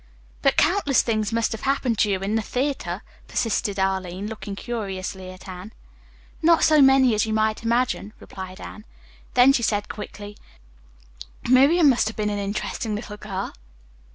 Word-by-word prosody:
"But -, -, +2 dB
countless 335 Hz, -7 st, +3 dB
things 215 Hz, -2 st, -1 dB
must 230 Hz, 0 st, 0 dB
have 225 Hz, -, -5 dB
happened 265 Hz, -4 st, 0 dB
to 210 Hz, -, +3 dB
you 190 Hz, -1 st, 0 dB
in 200 Hz, +2 st, -2 dB
the 225 Hz, -, +1 dB
theatre," 265 Hz, +6 st, -3 dB, 0.2 s
persisted 205 Hz, -3 st, -1 dB
Arline, 190 Hz, 0 st, -1 dB
looking 210 Hz, -2 st, -6 dB
curiously 190 Hz, -5 st, -5 dB
at 185 Hz, +2 st, -12 dB
Anne. 185 Hz, +4 st, -9 dB, 0.7 s
"Not 335 Hz, 0 st, +4 dB
so 310 Hz, -2 st, +5 dB
many 270 Hz, -2 st, +6 dB
as 215 Hz, +1 st, +1 dB
you 220 Hz, -, -1 dB
might 215 Hz, 0 st, +1 dB
imagine," 235 Hz, -2 st, 0 dB
replied 185 Hz, 0 st, -9 dB
Anne. 210 Hz, -, -9 dB, 0.5 s
Then 255 Hz, +2 st, +7 dB
she 245 Hz, -, +1 dB
said 205 Hz, -2 st, 0 dB
quickly, 205 Hz, -1 st, -8 dB, 1.1 s
"Miriam 280 Hz, +7 st, +5 dB
must 250 Hz, -5 st, +3 dB
have 220 Hz, -, -5 dB
been 210 Hz, -1 st, 0 dB
an 205 Hz, -, -2 dB
interesting 205 Hz, +2 st, -3 dB
little 210 Hz, -1 st, -7 dB
girl." 195 Hz, -2 st, -5 dB
215 Hz, 160 wpm, -23 LUFS, 200-250 Hz, 1.1 s, Then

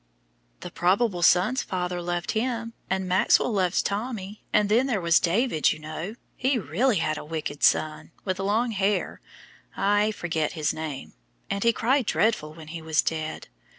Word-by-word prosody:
"The -, -, -7 dB
probable 185 Hz, +1 st, +1 dB
son's 185 Hz, +10 st, +4 dB
father 180 Hz, -1 st, -3 dB
loved 175 Hz, 0 st, -2 dB
him, 230 Hz, 0 st, -2 dB, 0.2 s
and 190 Hz, 0 st, -1 dB
Maxwell 185 Hz, +6 st, +3 dB
loves 185 Hz, -3 st, +1 dB
Tommy, 210 Hz, -1 st, -4 dB
and 210 Hz, -1 st, +3 dB
then 235 Hz, +6 st, +3 dB
there 230 Hz, -6 st, 0 dB
was 170 Hz, -1 st, +4 dB
David, 185 Hz, -, +2 dB
you -, -, -3 dB
know, 155 Hz, +7 st, -6 dB, 0.2 s
who 260 Hz, -2 st, +1 dB
really 225 Hz, -, +1 dB
had 155 Hz, -3 st, 0 dB
a -, -, -8 dB
wicked 150 Hz, -2 st, -5 dB
son, 155 Hz, -1 st, +2 dB, 0.2 s
with 185 Hz, -1 st, -2 dB
long 215 Hz, +5 st, +1 dB
hair 200 Hz, 0 st, -1 dB, 0.6 s
I 205 Hz, +2 st, +3 dB
forget 165 Hz, -7 st, -2 dB
his 155 Hz, -3 st, 0 dB
name 155 Hz, -4 st, -6 dB, 0.4 s
and 200 Hz, -, -1 dB
he 235 Hz, -, +5 dB
cried 250 Hz, +1 st, +1 dB
dreadful 195 Hz, -9 st, +1 dB
when 160 Hz, -2 st, -11 dB
he 165 Hz, 0 st, -6 dB
was 160 Hz, -1 st, +1 dB
dead. 155 Hz, -1 st, -3 dB
190 Hz, 165 wpm, -26 LUFS, 160-220 Hz, 0.6 s, he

